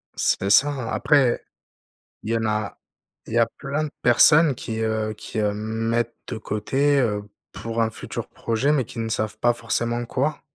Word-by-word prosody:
C'est 100 Hz, -, +1 dB
ça. 130 Hz, 0 st, +3 dB
Après, 140 Hz, -5 st, +3 dB, 0.8 s
il 110 Hz, -, -3 dB
y 115 Hz, -, +2 dB
en 115 Hz, -, -2 dB
a, 105 Hz, -1 st, -2 dB, 0.5 s
il -, -, -7 dB
y 120 Hz, -, +1 dB
a 115 Hz, -, +5 dB
plein 140 Hz, +3 st, -2 dB
de -, -, -5 dB
personnes 145 Hz, +5 st, +6 dB
qui, 110 Hz, -1 st, -5 dB
heu 110 Hz, -1 st, -1 dB
qui, 105 Hz, +1 st, -6 dB
heu, 105 Hz, -1 st, +1 dB
mettent 115 Hz, +2 st, -2 dB
de 115 Hz, -, -4 dB
côté, 135 Hz, +7 st, +1 dB
heu, 105 Hz, -5 st, 0 dB, 0.3 s
pour 115 Hz, 0 st, -3 dB
un 110 Hz, -, +2 dB
futur 110 Hz, -, -6 dB
projet, 115 Hz, +5 st, 0 dB
mais 140 Hz, -5 st, +1 dB
qui 115 Hz, -, -9 dB
ne 115 Hz, -, -2 dB
savent 110 Hz, -1 st, -2 dB
pas 120 Hz, +2 st, +3 dB
forcément 120 Hz, 0 st, -1 dB
quoi. 140 Hz, +5 st, -1 dB
115 Hz, 180 wpm, -23 LUFS, 110-130 Hz, 0.8 s, personnes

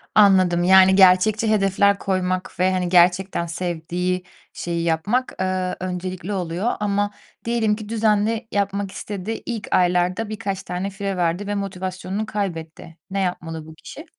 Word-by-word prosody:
Anladım. 185 Hz, -4 st, +5 dB
Yani, 190 Hz, +1 st, +6 dB
gerçekçi 195 Hz, +4 st, +5 dB
hedefler 200 Hz, -1 st, +3 dB
koymak 185 Hz, -2 st, -2 dB
ve, 185 Hz, +1 st, +3 dB
hani, 180 Hz, -1 st, -1 dB
gerçekten 180 Hz, 0 st, +3 dB
sevdiği 175 Hz, +1 st, -3 dB, 0.3 s
şeyi 170 Hz, -1 st, -3 dB
yapmak, 170 Hz, +10 st, 0 dB
eee, 185 Hz, -1 st, -1 dB
öncelikli 185 Hz, +1 st, -4 dB
oluyor 185 Hz, +4 st, -1 dB
ama 205 Hz, 0 st, 0 dB, 0.3 s
diyelim 230 Hz, -2 st, +1 dB
ki 215 Hz, -1 st, -9 dB
düzenli 220 Hz, +1 st, +1 dB
yapmak 200 Hz, -1 st, -1 dB
istedi, 205 Hz, +2 st, -5 dB
ilk 225 Hz, -4 st, -4 dB
aylarda 180 Hz, +4 st, +2 dB
birkaç 205 Hz, -3 st, -4 dB
tane 180 Hz, +2 st, -3 dB
fire 195 Hz, -1 st, -4 dB
verdi 175 Hz, +3 st, 0 dB
ve 205 Hz, -, -2 dB
motivasyonunu 190 Hz, +1 st, -4 dB
kaybetti. 165 Hz, -6 st, -5 dB
Ne 195 Hz, -, -1 dB
yapmalı 165 Hz, -4 st, -3 dB
bu 160 Hz, -, -11 dB
kişi? 300 Hz, -, -11 dB
190 Hz, 140 wpm, -22 LUFS, 180-205 Hz, 0.3 s, Yani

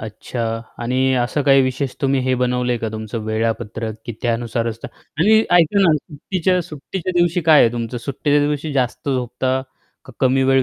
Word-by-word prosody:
अच्छा 110 Hz, +2 st, -6 dB, 0.4 s
आणि 130 Hz, +2 st, +1 dB
असं 125 Hz, +4 st, 0 dB
काही 135 Hz, -1 st, +5 dB
विशेष 130 Hz, +1 st, -2 dB
तुम्ही 135 Hz, -1 st, +1 dB
हे 130 Hz, 0 st, +1 dB
बनवलं 125 Hz, 0 st, 0 dB
आहे 120 Hz, -, -1 dB
का 110 Hz, -, -3 dB
तुमचं 110 Hz, +1 st, -5 dB
वेळापत्रक 110 Hz, 0 st, -2 dB
की 120 Hz, -, -4 dB
त्यानुसारच 115 Hz, -1 st, -1 dB
तर -, -, -4 dB, 0.3 s
आणि 215 Hz, +5 st, +6 dB
ऐका 175 Hz, +3 st, +4 dB
ना 175 Hz, -4 st, +5 dB
सुट्टीच्या 180 Hz, +5 st, -1 dB
सुट्टीच्या 170 Hz, +3 st, -5 dB
दिवशी 175 Hz, 0 st, +2 dB
काय 155 Hz, -2 st, +6 dB
आहे 115 Hz, -, +3 dB
तुमचं? 120 Hz, 0 st, -4 dB
सुट्टीच्या 145 Hz, +4 st, 0 dB
दिवशी 150 Hz, +1 st, -2 dB
जास्त 130 Hz, +1 st, -1 dB
झोपता, 130 Hz, 0 st, -1 dB, 0.4 s
का -, -, -13 dB
कमी 130 Hz, 0 st, +3 dB
वेळ 135 Hz, 0 st, +4 dB
130 Hz, 175 wpm, -20 LUFS, 120-150 Hz, 0.4 s, आणि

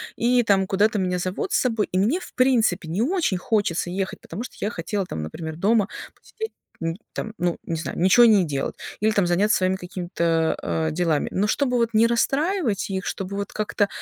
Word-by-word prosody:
и, 245 Hz, +1 st, +3 dB
там, 195 Hz, -3 st, +3 dB
куда-то 205 Hz, +3 st, +2 dB
меня 180 Hz, -2 st, 0 dB
зовут 185 Hz, +1 st, -3 dB
с -, -, +3 dB
собой, 225 Hz, -4 st, 0 dB
и 185 Hz, -, 0 dB
мне, 240 Hz, -, +2 dB
в -, -, -12 dB
принципе, 230 Hz, -9 st, +2 dB
не 180 Hz, +6 st, -1 dB
очень 320 Hz, -, +1 dB
хочется 180 Hz, -3 st, 0 dB
ехать, 190 Hz, +1 st, -3 dB
потому 230 Hz, -, -6 dB
что -, -, -9 dB
я 205 Hz, -, 0 dB
хотела 190 Hz, +3 st, -3 dB
там, 80 Hz, -, -5 dB
например, 160 Hz, -, -6 dB
дома 205 Hz, +3 st, +3 dB, 0.3 s
посидеть, 445 Hz, 0 st, -8 dB, 0.3 s
м, 165 Hz, 0 st, -1 dB, 0.2 s
там, 220 Hz, -, -5 dB
ну, 175 Hz, -4 st, 0 dB
не 165 Hz, -, -3 dB
знаю, 165 Hz, -, -5 dB
ничё 190 Hz, +7 st, +6 dB
не 210 Hz, -5 st, +5 dB
делать. 140 Hz, -3 st, -3 dB, 0.2 s
Или 215 Hz, +1 st, +2 dB
там 200 Hz, -4 st, +2 dB
заняться 195 Hz, +5 st, +3 dB
своими 185 Hz, 0 st, +1 dB
какими-то, 170 Hz, -3 st, -1 dB
а, 160 Hz, 0 st, -1 dB
делами. 160 Hz, -2 st, 0 dB
Но 200 Hz, +3 st, +1 dB
чтобы 250 Hz, +2 st, +1 dB
вот 235 Hz, -1 st, +2 dB
не 220 Hz, +2 st, +5 dB
расстраивать 270 Hz, -, 0 dB
их, 190 Hz, -1 st, -3 dB
чтобы 195 Hz, +1 st, -4 dB
вот 200 Hz, -1 st, -4 dB
как-то, 210 Hz, -1 st, 0 dB
200 Hz, 200 wpm, -23 LUFS, 175-225 Hz, 0.3 s, ничё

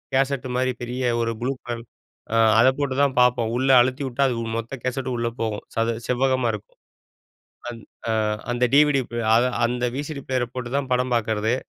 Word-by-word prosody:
Cassette 135 Hz, -1 st, +1 dB
மாரி 130 Hz, 0 st, +1 dB
பெரிய 125 Hz, +2 st, -4 dB, 0.2 s
ஒரு 115 Hz, 0 st, 0 dB
ப்ளூ 125 Hz, +3 st, 0 dB
கலர் 120 Hz, -1 st, -5 dB, 0.5 s
ஆ -, -, +3 dB, 0.2 s
அத 120 Hz, -, +6 dB
போட்டு 140 Hz, -3 st, -1 dB
தான் 140 Hz, -2 st, +2 dB
பார்ப்போம். 120 Hz, -2 st, +3 dB
உள்ள 130 Hz, +1 st, 0 dB
அழுத்தி 130 Hz, +3 st, 0 dB
வுட்டா 130 Hz, +2 st, 0 dB
அது 125 Hz, -, -1 dB, 0.2 s
மொத்த 115 Hz, +4 st, -5 dB
கேசெட்டும் 130 Hz, 0 st, -2 dB
உள்ள 120 Hz, 0 st, -1 dB
போகும், 110 Hz, -2 st, -2 dB
சது 115 Hz, +1 st, +1 dB
செவ்வகமா 130 Hz, 0 st, +1 dB
இருக்கும். 105 Hz, -1 st, -9 dB, 0.9 s
அந் 120 Hz, -1 st, -8 dB, 0.3 s
ஆ -, -, +2 dB, 0.4 s
அந்த 120 Hz, +1 st, +2 dB
டிவிடி 145 Hz, -2 st, +5 dB, 0.3 s
ஆ -, -, +6 dB, 0.3 s
அந்த 125 Hz, 0 st, -1 dB
விசிடி 145 Hz, 0 st, -5 dB
பிளேயர 130 Hz, -2 st, 0 dB
போட்டு 125 Hz, -1 st, -5 dB
தான் 140 Hz, -2 st, -3 dB
படம் 125 Hz, 0 st, 0 dB
பார்க்கறது. 110 Hz, 0 st, 0 dB
125 Hz, 175 wpm, -23 LUFS, 120-130 Hz, 0.9 s, அத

